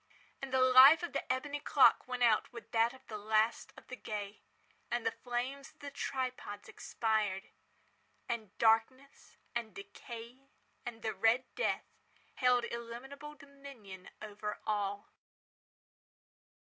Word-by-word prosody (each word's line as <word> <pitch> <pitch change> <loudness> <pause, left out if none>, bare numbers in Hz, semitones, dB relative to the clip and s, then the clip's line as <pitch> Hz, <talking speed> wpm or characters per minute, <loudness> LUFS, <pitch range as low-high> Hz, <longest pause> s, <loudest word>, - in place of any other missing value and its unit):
And 275 -1 -5
the 260 0 +3
life 260 +5 +8
of 345 - -4
the 275 - -2
ebony 285 +3 -2
clock 280 -3 +4
went 250 -1 -1
out 235 - +3
with 235 -2 -11
that 230 +1 +3
of 260 +1 -16
the 215 -1 -6
last 220 +2 +1
of - - -14
the 255 - -7
gay. 210 -4 -6 0.5
And 240 -1 -2
the - - +2
flames 260 +4 -4
of 310 - -36
the 285 0 -7
tripods 255 -7 -4
expired. 215 -4 -1 0.8
And 220 -4 -4
Darkness 235 +5 +1 0.2
and 235 -2 -4
Decay 250 - -10 0.4
and 230 -1 -7
the 220 - -1
Red 225 +6 +3
Death - - 0 0.5
held 250 -2 +3
illimitable 245 +6 -7
dominion 275 -10 -12
over 210 0 -5
all. 205 -1 -2
240 Hz, 130 wpm, -33 LUFS, 220-270 Hz, 0.8 s, life